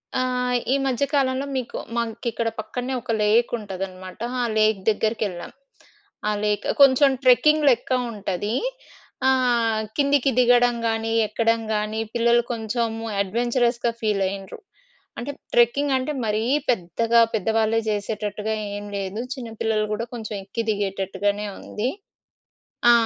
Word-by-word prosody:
ఆ! - - +2 0.5
ఈ - - +4
మధ్య 265 +1 +1
కాలంలో 270 -1 +1
మీకు 250 -2 -3 0.2
మాకిక్కడ 235 0 -2
పక్కన్నే 245 +4 -4
ఒక 230 - -4
లేక్ 220 +3 +3
ఉంటుందన్నమాట. 190 -3 -7 0.2
ఆ - - +1
లేక్ 215 -1 +3
దగ్గరికెళ్ళాం. 210 -4 -1 0.8
ఆ - - +2
లేక్ 210 -1 0 0.2
కొంచెం 275 +1 +7
ట్రెక్కింగ్ 295 +5 +5
లెక్క 250 - +1 0.2
ఉంటది. 205 +1 -3 0.7
ఆహ్, 240 -4 +2 0.2
కిందికి 280 -1 +3
దిగడం 245 0 +5
గానీ 225 0 -1 0.2
ఎక్కడం 230 +1 +1
గానీ 215 +1 -2 0.2
పిల్లలు 235 0 +4
కొంచెం 230 +1 -1 0.4
అడ్వెంచరస్‌గా 240 +3 0
ఫీల్ 210 -3 +1
అయ్యిండ్రు. 195 0 -6 0.6
అంటే 255 +4 -4 0.2
ట్రెక్కింగ్ 265 +4 +3
అంటే 260 +4 -2
మరీ 215 +1 0 0.3
పెద్దగా 230 +2 +2
పెద్దవాళ్లే 220 +2 +1
జేసేటట్టుగా 210 0 -2 0.2
ఏం 205 - -6
లేదు 195 +2 -4
చిన్న 250 -4 -7
పిల్లలు 215 -1 +1
గూడా 220 +2 -2
కొంచెం 220 -3 -5
ఎక్కి 200 +4 -4
దిగేటట్టుగానే 200 0 -1
ఉంది. 210 +3 -3 1.0
ఆ! - - +9
225 Hz, 120 wpm, -23 LUFS, 210-245 Hz, 1.0 s, ఆ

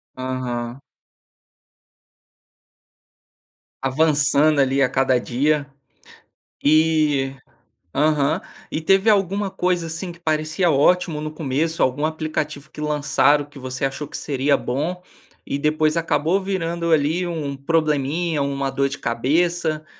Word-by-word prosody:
Aham. 130 -1 -4 3.0
Avançando 145 +1 +3
ali 135 0 +1
a 130 - +5
cada 130 0 +2
dia, 145 +5 0 1.0
e, 150 -3 +3 0.6
aham. 150 +3 +2 0.3
E 155 - -2
teve 195 +5 +3
alguma 200 -1 +1
coisa 180 -2 0
assim 170 +3 -5
que 170 - -15
parecia 160 +2 0
ótimo 160 +2 +2
no 155 0 -4
começo, 155 +2 -1
algum 130 +3 0
aplicativo 155 -2 -3
que 150 - -9
lançaram 145 -1 +2
que 145 -1 -14
você 130 +1 -3
achou 135 +2 -4
que - - -7
seria 140 0 +1
bom 160 +8 -3 0.4
e 140 - -3
depois 155 +1 +1
acabou 165 +2 +1
virando 170 -3 -2
ali 160 +4 +2
um 155 -5 -3
probleminha, 155 +2 0
uma 140 -1 -1
dor 140 +1 0
de 140 - -6
cabeça? 155 +6 0
150 Hz, 115 wpm, -21 LUFS, 140-165 Hz, 3.0 s, a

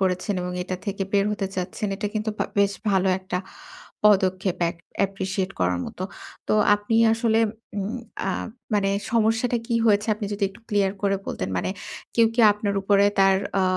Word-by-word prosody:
করেছেন 185 +2 0
এবং 180 0 -3
এটা 185 0 -4
থেকে 200 -1 -2
বের 200 -1 +3
হতে 200 -2 -2
চাচ্ছেন, 185 +4 -3
এটা 205 - -2
কিন্তু 215 +1 -1
ভা - - +1
বেশ 200 0 +4 0.2
ভালো 190 -1 +2
একটা 185 -1 -4 0.7
পদক্ষেপ 190 -3 +3
এক - - -8 0.3
appreciate 190 0 -3
করার 90 -1 +1
মতো। 185 - -6 0.4
তো - - +2 0.2
আপনি 205 +2 -2 0.2
আসলে 225 -1 +2 0.4
উম 205 +5 -2 0.3
আ - - +1 0.4
মানে 200 -1 +2 0.2
সমস্যাটা 225 +1 +2
কি 240 - -1
হয়েছে 210 -1 +3
আপনি 210 0 -4
যদি 205 0 -2
একটু 205 - -17
ক্লিয়ার 200 -2 +2
করে 200 -1 +2
বলতেন? 90 - -3
মানে 90 - -1 0.5
কেউ 230 -1 +6
কি - - -2
আপনার 205 -1 -2
উপরে 200 +1 +4
তার 195 0 +6 0.2
আ - - +3
200 Hz, 175 wpm, -24 LUFS, 190-210 Hz, 0.7 s, কেউ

